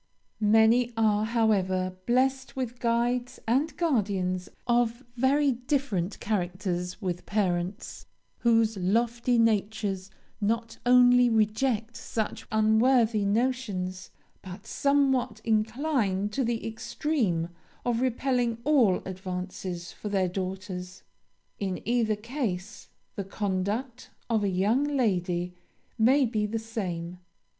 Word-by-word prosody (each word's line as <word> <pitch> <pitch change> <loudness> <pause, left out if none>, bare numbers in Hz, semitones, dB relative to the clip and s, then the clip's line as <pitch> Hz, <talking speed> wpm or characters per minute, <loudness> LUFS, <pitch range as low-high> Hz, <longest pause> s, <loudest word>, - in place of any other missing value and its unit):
"Many 225 +3 +4
are, 215 -1 +3
however, 190 -5 +1
blessed 260 +2 +1
with 250 -2 -4
guides 240 +2 0
and 275 +7 +1
guardians 195 - 0 0.2
of 240 0 +1
very 275 +3 +3
different 245 - -1
characters; 180 -2 -2
with 180 -2 -3
parents, 190 0 -2 0.3
whose 225 -2 +3
lofty 235 +6 +1
natures 205 -3 0 0.3
not 225 +2 -1
only 245 0 +6
reject 225 +1 +1
such 220 -1 -4
unworthy 220 0 +3
notions, 205 -5 -1 0.3
but 190 +2 -10
somewhat 270 -3 +1
incline 220 -2 0
to 265 +6 -1
the 235 -1 -2
extreme 225 - -1 0.4
of 240 -1 +1
repelling 250 -2 0
all 255 -10 +3
advances 185 -2 -5
for 210 - -6
their 195 -2 +1
daughters. 185 0 -5 0.6
In 190 -2 -2
either 230 -3 +2
case, 210 -4 -4 0.3
the 200 - -3
conduct 205 +5 -3 0.2
of 220 -2 +2
a 200 - +1
young 205 +9 +2
lady 180 -11 0 0.5
may 260 +5 +5
be 215 -3 -1
the 225 +2 -2
same. 180 -6 -5
220 Hz, 105 wpm, -27 LUFS, 190-245 Hz, 0.6 s, only